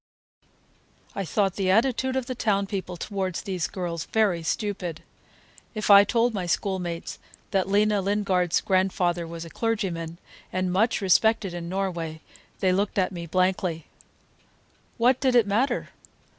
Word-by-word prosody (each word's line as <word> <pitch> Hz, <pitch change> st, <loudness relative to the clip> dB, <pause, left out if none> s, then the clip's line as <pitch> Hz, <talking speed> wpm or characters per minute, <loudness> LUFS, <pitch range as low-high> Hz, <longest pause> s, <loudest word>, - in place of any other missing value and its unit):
I 195 Hz, -, -3 dB
thought 195 Hz, +1 st, 0 dB
the 190 Hz, -2 st, 0 dB
attitude 260 Hz, +5 st, +2 dB
of 260 Hz, -2 st, -1 dB
the 255 Hz, -, -4 dB
town 205 Hz, -4 st, +1 dB
people 190 Hz, -3 st, -5 dB
toward 190 Hz, -1 st, -3 dB
these 185 Hz, -3 st, -2 dB
girls 170 Hz, -3 st, -4 dB
very 205 Hz, -6 st, +1 dB
stupid. 180 Hz, -2 st, -3 dB, 0.7 s
If 215 Hz, -1 st, +1 dB
I 200 Hz, 0 st, +9 dB
told 235 Hz, +2 st, +1 dB
my 185 Hz, -4 st, -3 dB
schoolmates 175 Hz, -2 st, -2 dB, 0.3 s
that 190 Hz, -1 st, +1 dB
Lena 205 Hz, 0 st, +3 dB
Lingard's 190 Hz, -3 st, +1 dB
grandfather 180 Hz, -2 st, +1 dB
was 165 Hz, 0 st, -7 dB
a 165 Hz, -, -11 dB
clergyman, 180 Hz, -8 st, -2 dB, 0.3 s
and 185 Hz, 0 st, -1 dB
much 220 Hz, +5 st, +2 dB
respected 200 Hz, 0 st, +3 dB
in 170 Hz, -1 st, -5 dB
Norway, 175 Hz, -4 st, -3 dB, 0.4 s
they 185 Hz, -, +3 dB
looked 200 Hz, +2 st, -1 dB
at 185 Hz, -1 st, +2 dB
me 170 Hz, -2 st, -6 dB
blankly. 185 Hz, -2 st, 0 dB, 1.1 s
What 250 Hz, +2 st, +3 dB
did 260 Hz, -3 st, +2 dB
it 235 Hz, -3 st, +6 dB
matter? 220 Hz, +7 st, 0 dB
190 Hz, 145 wpm, -25 LUFS, 175-210 Hz, 1.1 s, I